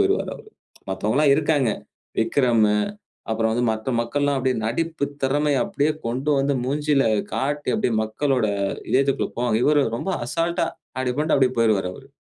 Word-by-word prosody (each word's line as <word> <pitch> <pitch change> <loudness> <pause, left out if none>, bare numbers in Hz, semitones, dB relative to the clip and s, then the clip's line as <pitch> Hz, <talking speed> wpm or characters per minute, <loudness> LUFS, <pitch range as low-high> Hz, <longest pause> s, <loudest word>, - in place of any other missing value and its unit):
போயிருவாரு 395 +1 +1
அவரு. 435 - -15 0.4
மத்தவங்க 105 +6 -1
எல்லாம் 145 -2 +5
இருக்காங்க. 145 -5 +2 0.5
விக்ரம்மு, 115 -3 +3 0.5
அப்புறம் 110 0 +1
வந்து 120 +1 0
மற்ற 110 +3 -5
மக்கள்லாம் 140 +4 0
அப்படியே 130 -1 0
நடிப்பு 160 +5 -1 0.2
திறமையை 145 +1 +2
அப்படியே 155 -7 0 0.2
கொண்டு 130 +6 -1
வந்து 140 +1 +1
மூஞ்சில 145 0 +1 0.3
காட்டி 145 +5 -2
அப்படியே 165 - 0
மக்களோட 125 +2 0 0.4
இதயத்துக்குள்ள 135 +1 +1
போவாங்க. 120 -2 +1
இவரு 145 -1 +4
ரொம்ப 190 - -3 0.2
அசால்ட்டா 170 +6 0 0.3
அப்படி 130 -1 0
பண்ணிட்டு 155 0 +2
அப்படியே 130 -1 +2
போயிருவாரு 105 -5 +2
அவரு. 135 +5 -13
135 Hz, 145 wpm, -23 LUFS, 115-150 Hz, 0.5 s, எல்லாம்